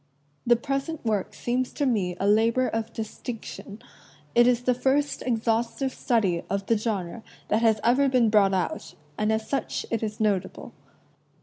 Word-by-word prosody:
The 240 - +6
present 275 +4 -3
work 210 -4 -1
seems 250 +1 -1
to 290 - -1
me 195 -8 0
a 195 - -1
labor 225 +5 +3
of 225 0 -3
distinction. 220 -1 -7 0.5
It 240 0 +5
is 245 -1 +2
the 250 - +3
first 275 +4 0
exhaustive 235 +2 0
study 195 -8 +1
of 195 0 -2
the 230 - +2
genre 210 -2 -3 0.3
that 215 +2 +2
has 220 -2 +3
ever 260 +4 +4
been 245 -4 +3
brought 200 -3 +4
out, 165 -3 -3 0.2
and 215 +4 0
as 220 0 -1
such 275 - -2
it 230 - 0
is 215 -1 -4
notable. 205 -4 -1
225 Hz, 165 wpm, -26 LUFS, 210-250 Hz, 0.5 s, The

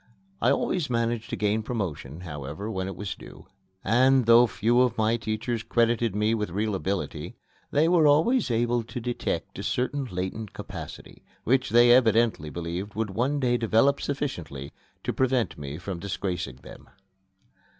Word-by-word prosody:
I - - +4
always 175 -7 0
managed 115 -1 -1
to - - -2
gain 105 +1 +1
promotion, 90 - -4
however, 75 +5 -6
when 95 -2 -3
it 95 - -5
was 100 -2 -4
due; - - -13 0.4
and, 130 +4 +4
though 115 +1 +7
few 115 +3 +2
of 125 -2 +2
my 110 +1 +2
teachers 115 +1 -2
credited 115 -2 +1
me 105 +2 +2
with 105 -3 -1
real 105 +4 -1
ability, 95 0 -3 0.3
they 150 +3 +3
were 170 -3 +5
always 160 - +3
able 120 +1 +1
to 115 +2 -7
detect 120 +1 -3
a - - -4
certain 135 +2 -1
latent 95 +1 -5
capacity, - - -9 0.2
which 130 +2 +2
they 120 +2 +6
evidently 115 - +3
believed 85 +5 -5
would 110 -2 -2
one 130 +8 0
day 120 -2 +2
develop 115 +5 +3
sufficiently 90 - -4 0.3
to - - -2
prevent 130 -2 +1
me 70 0 -6
from 90 0 -5
disgracing 90 -6 -3
them. - - -13
115 Hz, 160 wpm, -26 LUFS, 95-125 Hz, 0.4 s, though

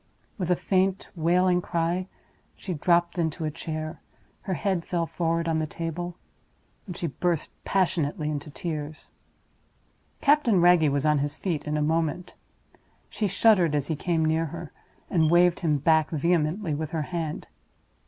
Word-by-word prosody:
With 180 -2 -2
a 180 - +4
faint, 190 +1 0
wailing 180 +2 +3
cry, 175 +2 -1 0.5
she 185 - -5
dropped 170 +2 +2
into 160 0 -1
a 155 - -1
chair; 155 0 -5 0.4
her 190 - -3
head 185 +1 -1
fell 170 -1 -1
forward 165 0 -1
on 160 -1 +1
the 155 - -1
table, 170 +2 -5 0.7
and 180 -2 -6
she - - -3
burst 170 +1 -1
passionately 165 -4 0
into 150 0 -3
tears. 155 -1 -6 1.1
Captain 280 - +4
Wragge 175 -3 +5
was 140 +1 0
on 150 -1 +3
his 145 +1 -2
feet 165 -6 -2
in 150 0 -1
a 150 - +1
moment. 160 +2 -1 0.8
She 210 - -1
shuddered 185 -5 +4
as 145 -1 -1
he 160 - 0
came 165 +1 0
near 160 +1 +1
her, 165 +1 -8 0.4
and 160 -3 +2
waved 175 +1 +4
him 155 -4 +1
back 160 +2 +3
vehemently 165 +2 0
with 155 +1 -3
her 160 -2 -2
hand. 160 -2 -4
165 Hz, 155 wpm, -26 LUFS, 155-180 Hz, 1.1 s, Wragge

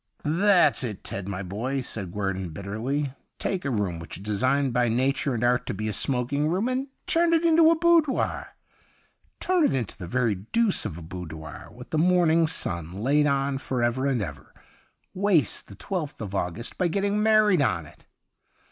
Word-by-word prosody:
' - - -37
That's 180 +1 +3
it, 110 -6 -5
Ted, 100 -1 -5
my 100 -1 -4
boy,' 115 +9 -3
said 100 -7 -5
Guerdon 95 -2 -3
bitterly; 115 - -3
' - - -51
take 190 -2 -2
a - - 0
room 100 -8 -1
which 85 - -8
is 95 - -11
designed 130 +6 +1
by 125 0 +2
nature 130 +3 0
and 115 - -2
art 125 +1 +2
to - - -2
be 110 - -3
a 105 - -2
smoking 135 +6 0
room 185 +8 0
and 255 +2 -1 0.2
turn 335 0 +3
it 330 +1 +2
into 325 -1 +6
a 330 - +3
boudoir. 330 -4 +1 0.8
Turn 365 -3 +2
it 290 - +2
into 120 -6 -3
the 90 - -6
very 120 +2 +1
deuce 195 - 0
of 90 -7 -4
a 85 - -9
boudoir 80 -3 -8
with - - -13
the 155 - +1
morning 170 -1 +4
sun 85 - -2
laid 140 +9 +2
on 140 -1 0
for 130 -3 -2
ever 125 +3 +1
and 125 -6 0
ever. 70 -7 -9 0.6
Waste 185 - +1
the 100 - -11
twelfth 160 - -4
of 100 -3 -6
August 100 +5 -3
by 180 - +3
getting 200 +4 0
married 215 -5 +4
on 85 - 0
it. 75 - -18
130 Hz, 190 wpm, -26 LUFS, -, 0.8 s, into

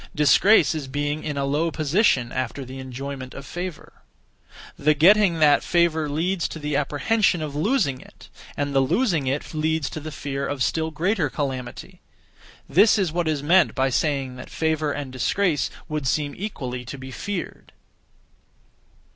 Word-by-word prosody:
Disgrace 165 +4 +5
is 150 -4 -4
being 145 +3 -2
in 150 -2 -3
a 140 - 0
low 150 +4 0
position 155 - +1
(after 130 +1 -3
the 130 +1 -9
enjoyment 130 0 -7
of 140 - -8
favour). 175 -2 -7 0.7
The 150 +1 +2
getting 185 +3 +5
that 150 -2 +5
(favour) 165 -3 +1
leads 170 +4 -1
to - - -8
the 150 -2 -3
apprehension 175 +7 +1
(of 145 -2 -5
losing 155 - +1
it), - - -16 0.3
and 145 -1 -2
the 135 - +4
losing 160 - +1
it 140 +5 -2
leads 155 -1 -1
to - - -5
the 155 +1 -7
fear 140 -1 -4
of 145 -2 -1
(still 160 +3 0
greater 165 +1 0
calamity): 130 -4 -5 0.7
this 200 +10 +5
is 190 -6 0
what 170 0 -1
is 150 -3 -1
meant 175 +5 +4
by 135 -1 +1
saying 135 -2 -1
that - - -9
favour 155 -2 0
and 140 -2 -5
disgrace 155 - 0 0.2
would 150 -4 -3
seem 145 +2 0
equally 130 -11 -5
to 130 +3 -8
be 130 0 -9
feared. 180 - -6
150 Hz, 165 wpm, -23 LUFS, 135-170 Hz, 0.7 s, Disgrace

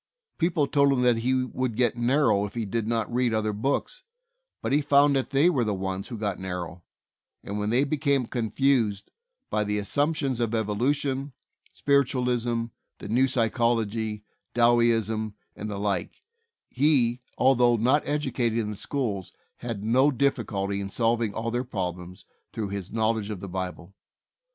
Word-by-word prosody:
People 165 -3 +2
told 140 0 +3
him 125 -2 +1
that 120 -2 +4
he 130 +2 +1
would 130 -2 -3
get 120 -1 +2
narrow 120 -3 +2
if 105 - -9
he 115 -2 -2
did 110 +2 -2
not 115 0 -1
read 120 -2 +1
other 110 -1 0
books, 140 - -2 0.6
but - - -2
he 145 - +4
found 145 0 +4
that 135 - 0
they 140 +4 +4
were 145 -9 +2
the 105 -2 -1
ones 95 0 -4
who 120 - -6
got 105 -3 -2
narrow, 90 -2 -5 0.6
and 100 +1 -4
when 105 0 -1
they 125 +5 +3
became 140 -2 +1
confused 115 -2 0 0.4
by 105 - +1
the 105 0 -1
assump 145 +10 0
tions 135 -5 -1
of 115 -1 0
evolution, 130 +6 -1 0.4
spiritualism, 125 -4 +1 0.3
the - - -9
new 125 +4 +3
psy 120 -3 +1
chology, 110 -2 -1 0.3
Dowieism, 115 -3 +2 0.2
and 105 - -6
the 100 - -4
like, 100 -3 -2 0.5
he, 125 -3 +2 0.2
although 125 -2 +4
not 125 +6 +3
educated 130 -6 0
in 110 -2 -1
the 105 - -7
schools, 105 -9 -3 0.3
had 115 -4 -5
no 130 +6 +4
difficulty 100 -7 -1
in 100 - -5
solving 115 0 +1
all 115 +2 -3
their 120 +1 -1
problems 90 -6 -5 0.3
through 110 -3 -4
his 100 -1 -5
knowledge 110 -1 0
of 105 -3 -5
the 100 - -7
Bible. 95 0 -5
115 Hz, 165 wpm, -26 LUFS, 105-130 Hz, 0.6 s, that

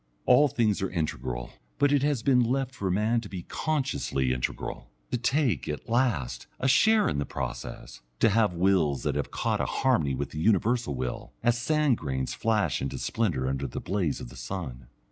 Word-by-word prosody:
All 145 +4 +6
things 110 -7 +1
are 95 - 0
integral, 65 -8 -3 0.3
but 145 - +3
it 145 -2 +3
has 140 -5 0
been 130 -2 +4
left 130 +2 -1
for 100 -7 -3
men 110 +5 +1
to 105 - -9
be 90 -3 -6
consciously 135 - -1
integral, 65 0 -4 0.2
to 125 - +1
take, 125 - +1
at 75 - -5
last, 115 - 0
a 135 - +1
share 215 - +5
in 70 - 0
the - - +1
process, - - -6 0.2
to - - +5
have 105 -1 +3
wills 85 -6 +2
that - - 0
have - - -2
caught - - -1
a - - 0
harmony 80 - +1
with 70 - -4
the 75 - -5
universal 110 - +2
will, 65 -1 -4
as 120 0 +3
sand 150 -2 +2
grains 65 -4 -2
flash 110 -2 0
into 70 - -3
splendour 85 - -1
under 70 +1 -1
the - - -5
blaze 95 -5 -1
of - - -8
the - - -13
sun. 65 -11 -6
100 Hz, 190 wpm, -28 LUFS, -, 0.3 s, All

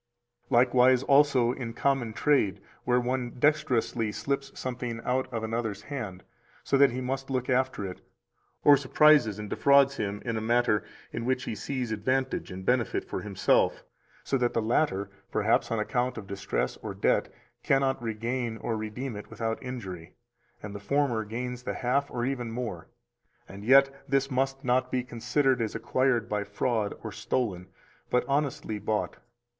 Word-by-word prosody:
303 125 - +3
Likewise 125 +1 +4
also 140 -4 +4
in 125 -3 -5
common 135 -2 0
trade 110 -6 +2 0.3
where 125 0 +3
one 125 0 -2
dexterously 125 -6 +1
slips 135 +6 -3
something 125 -2 -4
out 130 0 0
of 115 -2 -3
another's 110 -2 -3
hand, 105 -10 -6 0.4
so - - +1
that 140 0 +6
he 125 +1 -4
must 135 +1 -3
look 130 -1 -1
after 130 -5 +1
it, 90 -1 -7 0.6
or 145 - +8
surprises 140 -5 +4
and 105 0 -6
defrauds 140 0 +4
him 105 -1 -2
in 115 -2 -1
a - - -2
matter 115 -2 +2 0.3
in 115 - -3
which 130 +1 0
he - - -3
sees 125 +3 -3
advantage 130 +5 -1
and 95 +1 -7
benefit 125 0 +1
for - - -4
himself, 100 -3 +1 0.4
so 135 - 0
that 120 -1 +1
the - - +3
latter, 110 -4 0 0.2
perhaps 110 +2 +2
on 115 - -1
account 125 +4 -1
of 110 - -6
distress 100 0 -2
or - - -7
debt, - - +1 0.3
cannot 135 -1 +1
regain 115 +1 -2
or 115 - -2
redeem 110 +3 -4
it 105 - -8
without 115 -1 -3
injury, 95 -10 -7 0.5
and 105 -1 -6
the 100 - -6
former 120 +1 +1
gains 125 +3 -5
the - - -4
half 135 +3 0
or 120 -1 -2
even 125 -3 -2
more; 115 -8 -5 0.6
and 100 +1 -10
yet 135 +3 +6 0.2
this 135 +1 +1
must 135 +1 -1
not 125 0 +1
be 125 -1 0
considered 125 +2 +1
as 110 - -2
acquired 130 -3 +1
by 105 -1 -1
fraud 105 +1 -1
or - - -5
stolen, 95 -8 -2 0.4
but 125 - +2
honestly 140 -6 -1
bought. 105 +1 -2
125 Hz, 165 wpm, -28 LUFS, 110-135 Hz, 0.6 s, or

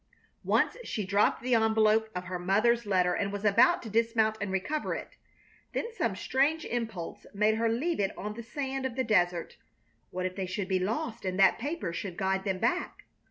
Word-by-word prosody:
Once - - +2
she 210 - -3
dropped 200 +4 +2
the 255 0 +1
envelope 220 -1 +3
of 180 - -3
her 180 0 -5
mother's 215 +5 +2
letter 180 -2 +2
and 200 +2 -1
was 205 +1 -5
about 230 +5 +5
to - - -7
dismount 225 0 +2
and 200 -1 -2
recover 245 +12 -1
it. - - -8 0.6
Then 460 - -3
some - - -1
strange 300 +5 +1
impulse 225 -8 -4
made 210 +2 +3
her 230 0 +1
leave 275 +8 -1
it 195 -1 -1
on 210 +1 -4
the 235 - -7
sand 265 +2 -3
of 245 - -9
the 260 - 0
desert. 175 -7 +1 0.5
What 185 0 -3
if 185 0 -3
they 190 -2 -3
should 190 +1 -3
be 190 -1 +2
lost 225 +4 -2
and 185 -1 -2
that 190 - +5
paper 290 - -3
should 180 0 -5
guide 190 0 0
them 190 -2 0
back? 355 - -1
215 Hz, 200 wpm, -29 LUFS, 190-235 Hz, 0.6 s, about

